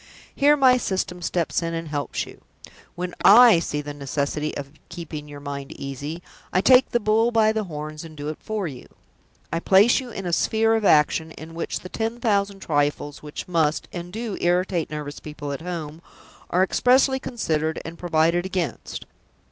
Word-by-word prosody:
Here 290 +1 +4
my 260 -2 +6
System 185 -5 -2
steps 170 0 -1
in 165 0 -3
and 165 -1 -5
helps 145 -1 -2
you! - - -14 0.5
When 180 0 -4
I 230 -3 +8
see 150 -3 -3
the 145 0 -7
necessity 145 +2 -2
of 140 -1 -7 0.2
keeping 165 -4 -7
your 145 -1 -9
mind 140 -1 -6
easy, 140 +5 -6 0.3
I 185 - +2
take 255 +6 +6
the 240 - +1
bull 220 +2 +3
by 220 -2 +3
the 220 -1 -2
horns 155 -2 -6
and 160 -2 -11
do 145 0 -5
it 155 - -6
for 215 -4 -3
you. 135 -5 -9 0.7
I 165 - +1
place 200 +9 +5
you 255 -2 -7
in 195 -4 -6
a 175 - -2
sphere 225 +5 +2
of 220 -2 +1
action 160 0 +3
in 160 +1 -10
which 165 - -4
the 185 - -9
ten 225 +3 -3
thousand 200 -4 0
trifles 145 -2 -1
which 150 0 -7
must, 160 -4 +1
and 175 0 -6
do, 220 0 -4
irritate 175 -1 +1
nervous 150 -1 -6
people 150 -1 -7
at 140 - -5
home 165 -2 -6 0.5
are 180 +2 +3
expressly 260 +6 +3
considered 160 - -2
and 165 +1 -8
provided 170 0 +2
against. 185 -4 -4
170 Hz, 180 wpm, -24 LUFS, 150-210 Hz, 0.7 s, I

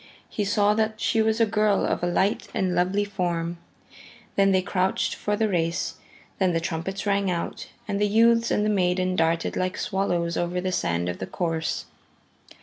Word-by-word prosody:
He 210 - -2
saw 205 +1 +3
that 220 0 -1
she 225 - +2
was 220 +1 +1
a 230 - +5
girl 210 -1 +2
of - - -1
a 175 - 0
light 190 +4 +1
and 190 -4 +1
a - - -1
lovely 190 +4 +1
form. 175 -4 -2 0.8
Then 195 0 +4
they 185 -1 +2
crouched 185 0 0
for 210 - -1
the 220 +1 +1
race; 170 -4 -1 0.4
then 185 -2 +2
the 165 - +1
trumpets 175 +4 -4
rang 200 -1 +1
out, 170 -2 -3 0.2
and 200 -1 -2
the 210 - +4
youths 230 +2 +4
and 210 - +1
the - - +2
maiden 185 -2 +1
darted 165 0 +1
like 185 0 -1
swallows 175 -4 -1
over 175 +1 -1
the 185 +1 -2
sand 85 - -1
of 90 - -4
the 95 - -4
course. 165 -2 -2
190 Hz, 190 wpm, -25 LUFS, 175-205 Hz, 0.8 s, a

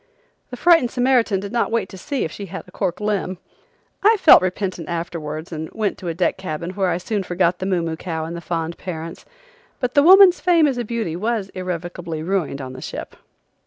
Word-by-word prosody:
The 250 - -7
frightened 330 -3 +5
Samaritan 245 -5 +2
did 200 +1 -6
not 240 -1 0
wait 225 -4 0
to - - -10
see 280 +3 -2
if 160 - -5
she 200 +3 -7
had 190 +2 -8
a - - -15
cork 180 -3 -2
limb! 205 -3 -1 0.6
I 435 +2 +5
felt 335 - +8
repentant 185 -2 -3
afterwards 165 -2 -5
and 160 -1 -5
went 215 -2 -2
to 180 - -7
a 165 - -1
deck 175 +1 +1
cabin 170 -1 -4
where 190 -1 0
I 170 - 0
soon 205 +3 -2
forgot 180 -1 0
the 185 - -3
moo 180 -3 +1
moo 165 -1 -2
cow 160 -1 -4
and 165 +1 -6
the 170 - -6
fond 170 -1 -3
parents. 165 -2 -7 0.5
But 250 -2 -2
the 285 - +6
woman's 370 +3 +8
fame 345 -3 +4
as 265 -4 0
a - - -1
beauty 225 -7 -3
was 215 +1 -2
irrevocably 175 -3 -5
ruined 165 -6 -1
on 130 -1 -7
the 130 - -9
ship. - - -7
185 Hz, 215 wpm, -21 LUFS, 170-230 Hz, 0.6 s, felt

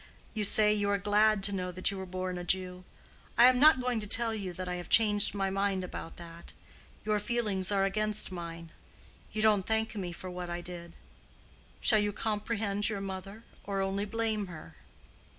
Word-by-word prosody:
You 215 - -1
say 210 +1 +5
you 205 -1 0
are 200 - +2
glad 210 0 +2
to 200 - +3
know 180 -2 -3
that 185 +2 0
you 200 - -6
were 190 - -6
born 185 0 -4
a - - -5
Jew. 180 0 -2 0.5
I 235 - +8
am 255 0 +5
not 300 -1 +7
going 250 -2 0
to 210 - -4
tell 230 +2 +2
you 200 -4 -4
that 185 +1 -6
I 180 0 -3
have 175 - -8
changed 210 -2 +4
my 195 -1 -1
mind 195 -1 0
about 175 -2 -7
that. 170 -1 -11 0.5
Your 215 -1 +1
feelings 210 -4 -1
are 195 -1 +2
against 215 +1 0
mine. 170 -2 -7 0.6
You 215 - -2
don't 210 -3 +3
thank 220 +1 0
me 190 -5 -4
for 180 +2 -8
what 180 -1 -6
I 175 0 -3
did. 175 -1 -7 0.9
Shall 215 - +5
you 205 0 0
comprehend 210 -1 -1
your 205 -2 -3
mother, 195 +3 -7 0.2
or 200 -1 -3
only 195 +1 -1
blame 220 -1 -1
her?" 155 - -11
200 Hz, 195 wpm, -30 LUFS, 185-215 Hz, 0.9 s, I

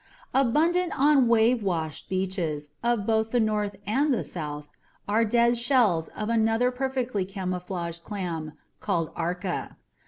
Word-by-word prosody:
Abundant 325 +8 +2
on 280 -3 +5
wave 230 +1 +4
washed 165 -6 -3
beaches 180 -6 -2
of 235 -4 +1
both 220 0 +1
the 245 - +1
North 210 -2 0
and 275 +9 +2
the 245 - +1
South 150 -3 -6 0.4
are 215 +3 +3
dead 235 +1 +3
shells 235 - +3
of 215 - -2
another 225 +2 +2
perfectly 255 -5 -1
camouflaged 180 -3 -4
clam 170 -6 -4 0.3
called 170 -5 -1
ARCA. 175 +2 -3
210 Hz, 130 wpm, -26 LUFS, 180-240 Hz, 0.4 s, on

